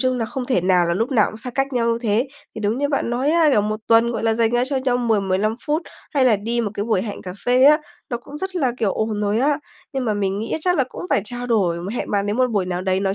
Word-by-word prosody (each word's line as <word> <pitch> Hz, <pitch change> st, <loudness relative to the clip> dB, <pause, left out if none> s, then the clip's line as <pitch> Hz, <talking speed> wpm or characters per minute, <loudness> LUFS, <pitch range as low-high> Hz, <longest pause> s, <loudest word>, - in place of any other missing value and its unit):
chung 255 Hz, -1 st, +1 dB
là 230 Hz, -, 0 dB
không 250 Hz, +2 st, -5 dB
thể 250 Hz, -9 st, +2 dB
nào 180 Hz, -1 st, +3 dB
là 170 Hz, -, 0 dB
lúc 225 Hz, +8 st, -1 dB
nào 220 Hz, -5 st, +4 dB
cũng 215 Hz, -, -9 dB
xa 250 Hz, +3 st, -6 dB
cách 270 Hz, +2 st, -1 dB
nhau 235 Hz, -2 st, +1 dB
như 230 Hz, -, -1 dB
thế. 230 Hz, +4 st, +1 dB, 0.3 s
Thì 220 Hz, -, -6 dB
đúng 215 Hz, +3 st, 0 dB
như 285 Hz, +1 st, 0 dB
bạn 275 Hz, -4 st, -1 dB
nói 255 Hz, +5 st, +1 dB
á, 325 Hz, -1 st, +4 dB
kiểu, 215 Hz, -, +4 dB
một 215 Hz, +1 st, -2 dB
tuần, 230 Hz, +1 st, +4 dB
gọi 225 Hz, -, -3 dB
là, 225 Hz, -1 st, +2 dB
dành 225 Hz, -1 st, +2 dB
ra 240 Hz, +1 st, +2 dB
cho 275 Hz, -, -1 dB
nhau 260 Hz, -2 st, +1 dB
10-15 215 Hz, -3 st, +1 dB
phút, 305 Hz, +3 st, 0 dB, 0.3 s
hay 270 Hz, -3 st, +4 dB
là 225 Hz, -5 st, +5 dB
đi 230 Hz, +4 st, -2 dB
một 210 Hz, -3 st, -2 dB
cái 205 Hz, -, -2 dB
buổi 220 Hz, -5 st, +1 dB
hẹn 210 Hz, -3 st, -6 dB
cà 180 Hz, -, -6 dB
phê 250 Hz, +1 st, +4 dB
á, 300 Hz, +2 st, +7 dB, 0.3 s
nó 240 Hz, -, 0 dB
cũng 295 Hz, -, -9 dB
rất 380 Hz, +2 st, -4 dB
là, 265 Hz, -8 st, +1 dB
kiểu, 210 Hz, -5 st, +1 dB
ổn 215 Hz, -1 st, -2 dB
rồi 210 Hz, +1 st, +1 dB
á. 285 Hz, +3 st, +2 dB, 0.3 s
Nhưng 265 Hz, -2 st, -2 dB
mà 215 Hz, -3 st, 0 dB
mình 195 Hz, -1 st, -1 dB
nghĩ 220 Hz, +2 st, -4 dB
á -, -, 0 dB
chắc 360 Hz, +2 st, +1 dB
là 270 Hz, -, +3 dB
cũng -, -, -8 dB
phải -, -, +3 dB
trao 245 Hz, +2 st, -6 dB
đổi, 190 Hz, -8 st, +1 dB, 0.2 s
hẹn -, -, -3 dB
bạn 200 Hz, -1 st, 0 dB
ấy 210 Hz, -, 0 dB
một 255 Hz, 0 st, +2 dB
buổi 200 Hz, -5 st, 0 dB
nào 180 Hz, 0 st, -2 dB
đấy 190 Hz, 0 st, 0 dB
nói 195 Hz, 0 st, 0 dB
230 Hz, 310 wpm, -21 LUFS, 205-260 Hz, 0.3 s, á